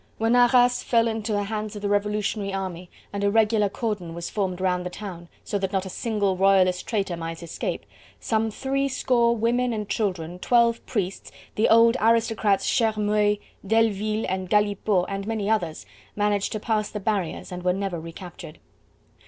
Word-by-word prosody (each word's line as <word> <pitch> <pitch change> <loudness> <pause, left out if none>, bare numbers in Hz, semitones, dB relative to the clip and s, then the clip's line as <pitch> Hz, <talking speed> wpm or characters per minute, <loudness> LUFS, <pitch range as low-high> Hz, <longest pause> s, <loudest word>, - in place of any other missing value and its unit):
When 225 +2 +2
Arras 245 0 +5
fell 230 -1 +2
into 220 -1 -2
the 205 -1 +1
hands 215 0 -4
of 205 - -7
the - - 0
Revolutionary 205 0 0
army, 185 -2 -5 0.2
and 200 0 -2
a 200 - +3
regular 215 -1 +3
cordon 205 -6 -4
was 170 0 -5
formed 190 -3 -2
round 180 -1 0
the 180 - -4
town, 180 -3 -8
so 205 - -2
that 195 -1 -2
not 195 -1 -1
a 190 - -6
single 205 -4 0
royalist 185 -1 +3
traitor 195 -5 -1
might 165 0 -6
escape, 170 - -4 0.3
some 220 0 0
three 275 +5 -1
score 240 -3 +2
women 240 +2 +1
and 210 -2 -3
children, 180 -5 -2
twelve 235 +1 +3
priests, 195 -3 -3 0.2
the 215 - +2
old 230 +2 +6
aristocrats 225 -3 +2
Chermeuil, 210 -2 +2 0.3
Delleville 215 0 +1
and 185 -1 -3
Galipaux 205 -2 +2
and 195 0 -4
many 220 -3 -2
others, 175 - -1 0.3
managed 205 -1 0
to 215 - -2
pass 215 -1 -1
the 210 - -5
barriers 200 -4 -2
and 180 0 -5
were 180 0 +2
never 190 -2 -2
recaptured. 165 -1 -10
205 Hz, 170 wpm, -25 LUFS, 190-225 Hz, 0.3 s, old